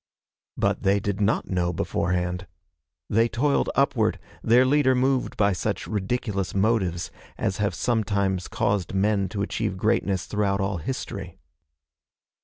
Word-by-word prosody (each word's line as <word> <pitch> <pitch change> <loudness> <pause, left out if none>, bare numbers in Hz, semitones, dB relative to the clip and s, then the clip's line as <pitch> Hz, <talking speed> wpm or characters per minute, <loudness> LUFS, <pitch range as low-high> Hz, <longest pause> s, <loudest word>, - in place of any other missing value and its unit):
But - - +1
they 100 +1 +3
did 100 0 -2
not 105 +2 +1
know 90 -1 +1
beforehand. 90 +1 -1 0.6
They 115 +2 +2
toiled 140 +6 +1
upward, 125 -5 +2 0.2
their 120 +3 +5
leader 130 -1 +3
moved 130 +1 +1
by 100 -1 +3
such 90 - -2
ridiculous 100 -2 -2
motives 95 -4 +1 0.3
as 95 - -1
have 105 -1 0
sometimes 100 -5 0
caused 100 -2 -1
men 100 -1 +1
to 100 0 -2
achieve 105 -2 -2
greatness 100 -2 +1
throughout 100 -2 0
all 95 -1 -1
history. 125 - -5
100 Hz, 130 wpm, -25 LUFS, 95-115 Hz, 0.6 s, their